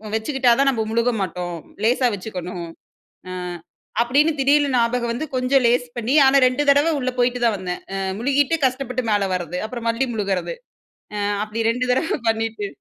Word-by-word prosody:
வச்சுக்கிட்டா 250 +2 +1
தான் 275 0 +4
நம்ம 225 -4 -1
முழுக 235 +2 +2
மாட்டோம். 175 -1 -4 0.3
லேசாக 245 +1 +3
வச்சுக்கணும். 180 -3 -6 0.6
அ - - -6 0.7
அப்படின்னு 285 +7 +3
திடீர்னு 285 +1 +3
ஞாபகம் 235 0 +1
வந்து 265 +7 -3
கொஞ்சம் 255 +1 +2
லேஸ் 245 +1 +2
பண்ணி, 240 +3 -1
ஆனா 275 +1 +5
2 255 +3 0
தடவை 285 +4 +4
உள்ள 255 - -1
போய்ட்டு 245 0 +1
தான் 225 -3 +2
வந்தேன். 180 -1 -5
அ - - -2 0.2
முழுகிட்டு 280 +5 +2
கஷ்டப்பட்டு 255 -1 -1
மேல 200 -2 +1
வர்றது 175 0 -4
அப்புறம் 235 0 -5
மல்லி 235 +4 0
முழுகறது 200 - -2 0.6
அ - - -2 0.3
அப்படி 215 +2 -3
2 250 +2 -1
தடவ 295 +5 0
பண்ணிட்டு. 225 -2 -1
240 Hz, 165 wpm, -21 LUFS, 215-265 Hz, 0.7 s, ஆனா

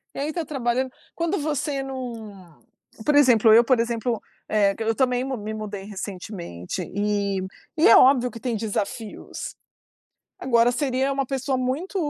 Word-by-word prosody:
E - - -5
aí, 295 +3 -1
tá 335 0 -3
trabalhando? 260 -2 -1 0.2
Quando 335 +2 -1
você 290 -2 -1
não, 260 -2 -5 0.9
por 295 - +2
exemplo, 245 -6 +6
eu, 230 +2 +8
por 245 0 +3
exemplo, 230 0 -1 0.3
eh, 200 -2 +2
q 225 - -4
eu 225 - +2
também 250 -1 +1
me 220 -5 -4
mudei 205 -2 -6
recentemente 185 - -6
e 200 -1 0 0.4
e 315 - +5
é - - +9
óbvio 255 -2 +5
que 230 - -9
tem 240 -1 -2
desafios. 215 0 -4 0.9
Agora, 235 -1 +3
seria 265 0 0
uma 275 0 0
pessoa 270 0 -1
muito, 270 +11 -2
245 Hz, 155 wpm, -24 LUFS, 215-270 Hz, 0.9 s, é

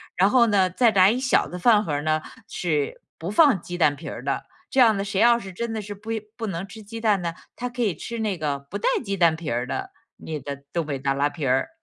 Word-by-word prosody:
然 190 +3 +4
后 240 -1 +5
呢， 195 -4 +3
再 230 +6 +3
来 190 -1 +6
一 245 - -1
小 260 -1 +2
的 180 - -7
饭 215 +1 +5
盒 165 - -4
儿 145 0 -1
呢 155 0 +1 0.3
是 150 -5 -2 0.2
不 165 +3 -5
放 265 - +5
鸡 175 0 -6
蛋 145 -3 +4
皮 - - -12 0.2
的。 - - -1 0.3
这 260 - +4
样 220 -4 +5
呢， 195 - -2
谁 200 0 0
要 235 0 +6
是 190 -4 -9
真 235 +4 -3
的 220 -1 -3
是 205 0 -7
不 210 +3 -12 0.3
不 230 -2 -4
能 190 0 -4
吃 220 +2 -11
鸡 225 +2 -8
蛋 210 -4 +2
呢， 170 -1 -2 0.2
他 250 +1 -4
可 245 0 -5
以 200 -8 +1
吃 235 +9 -6
那 210 -5 -1
个 145 -3 -2
不 140 - -7
带 - - +1 0.2
鸡 200 -1 -1
蛋 170 -3 +4
皮 165 0 -10 0.2
的 - - -4 0.3
你 155 -1 -5
的 140 0 -7
东 170 -3 0
北 140 -2 -3
大 135 0 0
拉 145 +1 +1
皮 150 -2 -5
儿。 130 - +1
195 Hz, 280 characters per minute, -24 LUFS, 155-225 Hz, 0.3 s, 来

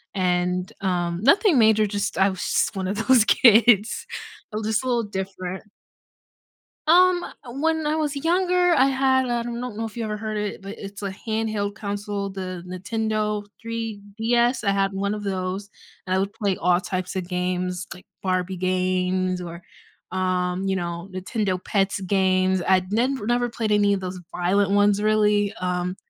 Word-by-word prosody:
and, 180 +1 0
um 175 -2 -1
nothing 325 - +5
major, 220 -1 +5
just 205 -2 -2
I 190 +1 +4
was 190 -2 -6
just - - 0
1 190 -1 -2
of 205 +4 -3
those 255 -4 +6
kids, 225 -1 +5 0.4
uh, 210 - -4
just 220 +2 0
a - - -4
little 240 -2 +1
different. 190 -2 -5 1.3
Um, 355 +2 +5 0.4
when 320 0 +1
I 300 +1 +1
was 300 -2 -1
younger 355 +3 +2
I 265 -4 +5
had 265 -1 +2
a 240 -1 -1
don't 240 -1 -5
know 225 - -2
if 220 - -8
you 235 - -3
ever 210 -1 -3
heard 215 0 -4
it, 210 -1 -3
but 200 +3 -7
it's 200 +1 -8
a 200 - -2
handheld 215 -1 -2
console, 205 -1 -4
the 185 -2 -6
Nintendo 210 +2 -2 0.2
3DS. 230 +2 -1
I 200 - +2
had 195 0 +1
1 200 +1 -1
of 210 - -5
those, 190 +1 -3 0.4
and 185 - +1
I - - +2
would 200 +1 -2
play 200 -3 -1
all 180 +1 +2
types 185 0 -4
of 185 -2 -3
games, 180 0 -2
like, 180 - -15 0.2
Barbie 185 0 -1
games, 185 0 0
or, 170 0 -7 0.5
um, 185 0 -1
you 190 - +1
know, 170 0 -4
Nintendo 185 0 -2
Pets 195 -1 0
games, 185 -1 +2
I'd 185 0 +2
nin 255 +5 +1
never 240 0 +1
played 225 -2 -2
any 205 -1 +4
of 200 - 0
those 185 -1 -5 0.2
violent 195 +3 +2
ones 205 0 +3
really, 210 -1 +2
um, 180 0 -1
200 Hz, 170 wpm, -24 LUFS, 185-225 Hz, 1.3 s, those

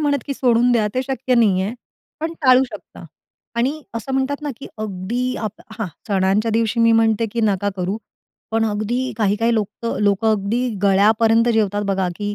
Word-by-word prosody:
म्हणत 290 -1 +1
की 275 - -3
सोडून 245 -1 +3
द्या, 220 -3 +2
ते 255 - +1
शक्य 260 -1 -1
नाही 200 -6 +3
आहे. 210 +5 -3 0.5
पण 325 +1 -2
टाळू 255 -1 +6
शकता 250 - -11 0.5
आणि 250 +4 +2 0.2
असं 230 +4 -4
म्हणतात 270 +2 -1
ना 295 - -2
की 275 - -9
अगदी 215 +5 -3
आप 210 - -9 0.2
हां, 220 - -1 0.2
सणांच्या 200 +3 +1
दिवशी 225 +1 +1
मी 230 0 +5
म्हणते 225 0 +3
की 235 - -1
नका 205 -1 +1
करू, 185 +3 -2 0.5
पण 225 0 +1
अगदी 225 +4 -1
काही-काही 220 +2 +1
लोकं 215 +2 -3
लोकं 205 +2 +2
अगदी 215 +5 0
गळ्यापर्यंत 220 +4 +4
जेवतात 205 -2 +1
बघा, 190 -1 0
की 205 0 -3
225 Hz, 175 wpm, -20 LUFS, 205-245 Hz, 0.5 s, टाळू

